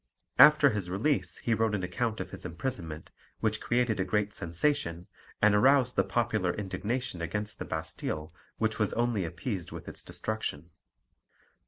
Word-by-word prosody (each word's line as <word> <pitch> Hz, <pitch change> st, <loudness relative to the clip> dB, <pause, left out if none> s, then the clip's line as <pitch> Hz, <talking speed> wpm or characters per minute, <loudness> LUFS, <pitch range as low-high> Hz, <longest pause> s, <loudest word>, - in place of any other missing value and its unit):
After 150 Hz, 0 st, +8 dB
his 100 Hz, -4 st, -3 dB
release 115 Hz, +11 st, 0 dB
he 115 Hz, -, 0 dB
wrote 110 Hz, -1 st, +1 dB
an 95 Hz, -, -3 dB
account 110 Hz, +5 st, -1 dB
of -, -, -5 dB
his -, -, -6 dB
imprisonment, 85 Hz, -5 st, -5 dB, 0.3 s
which 110 Hz, -1 st, 0 dB
created 120 Hz, -3 st, +1 dB
a -, -, +3 dB
great 105 Hz, +2 st, 0 dB
sensation, 85 Hz, -, 0 dB, 0.4 s
and 105 Hz, 0 st, +6 dB
aroused 125 Hz, +3 st, +4 dB
the -, -, +4 dB
popular 110 Hz, -6 st, 0 dB
indignation 105 Hz, 0 st, -3 dB
against 105 Hz, +5 st, -3 dB
the -, -, -4 dB
Bastille 80 Hz, 0 st, -4 dB, 0.2 s
which 110 Hz, -1 st, 0 dB
was 105 Hz, -, +1 dB
only 115 Hz, -5 st, +1 dB
appeased 95 Hz, +2 st, -4 dB
with -, -, -8 dB
its -, -, -6 dB
destruction. 85 Hz, -7 st, -4 dB
105 Hz, 155 wpm, -30 LUFS, 90-120 Hz, 0.4 s, After